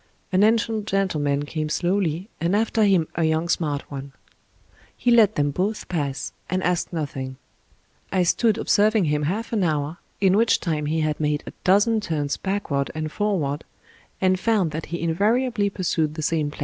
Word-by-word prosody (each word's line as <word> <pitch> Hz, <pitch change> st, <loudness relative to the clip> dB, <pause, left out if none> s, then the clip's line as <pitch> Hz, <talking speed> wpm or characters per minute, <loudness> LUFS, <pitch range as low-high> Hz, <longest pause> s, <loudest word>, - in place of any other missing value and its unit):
An 185 Hz, +1 st, +3 dB
ancient 220 Hz, 0 st, +2 dB
gentleman 150 Hz, -8 st, 0 dB
came 155 Hz, 0 st, -3 dB
slowly, 175 Hz, +1 st, 0 dB
and 170 Hz, +4 st, +1 dB
after 220 Hz, +1 st, +2 dB
him 185 Hz, -6 st, +3 dB
a 165 Hz, -, 0 dB
young 160 Hz, +1 st, +1 dB
smart 150 Hz, -5 st, -1 dB
one. 140 Hz, -1 st, -7 dB, 0.8 s
He 245 Hz, -, +1 dB
let 220 Hz, -3 st, +5 dB
them 145 Hz, 0 st, +1 dB
both 195 Hz, +8 st, -2 dB
pass 145 Hz, -6 st, -3 dB, 0.2 s
and 185 Hz, +1 st, -1 dB
asked 180 Hz, -1 st, 0 dB
noth 155 Hz, -5 st, -3 dB
ing. 130 Hz, -1 st, -5 dB, 0.7 s
I 185 Hz, -2 st, +2 dB
stood 220 Hz, +5 st, +2 dB
observing 215 Hz, -2 st, +3 dB
him 150 Hz, -1 st, +1 dB
half 225 Hz, +5 st, -3 dB
an 210 Hz, -4 st, +2 dB
hour, 155 Hz, +1 st, -1 dB, 0.2 s
in 190 Hz, -1 st, +4 dB
which 225 Hz, +2 st, +3 dB
time 150 Hz, -3 st, -2 dB
he 160 Hz, +1 st, 0 dB
had 155 Hz, -1 st, -1 dB
made 150 Hz, -1 st, 0 dB
a -, -, -8 dB
dozen 205 Hz, +4 st, +4 dB
turns 150 Hz, -7 st, -1 dB
backward 190 Hz, -9 st, -2 dB
and 155 Hz, -1 st, -3 dB
forward, 160 Hz, -9 st, -1 dB, 0.6 s
and 185 Hz, -1 st, +2 dB
found 200 Hz, -6 st, +1 dB
that 155 Hz, +1 st, -5 dB
he 170 Hz, -, -4 dB
invariably 210 Hz, +5 st, +1 dB
pursued 170 Hz, -5 st, -1 dB
the 155 Hz, -, -4 dB
same 155 Hz, -1 st, 0 dB
plan. 145 Hz, -, -12 dB
175 Hz, 175 wpm, -23 LUFS, 150-205 Hz, 0.8 s, let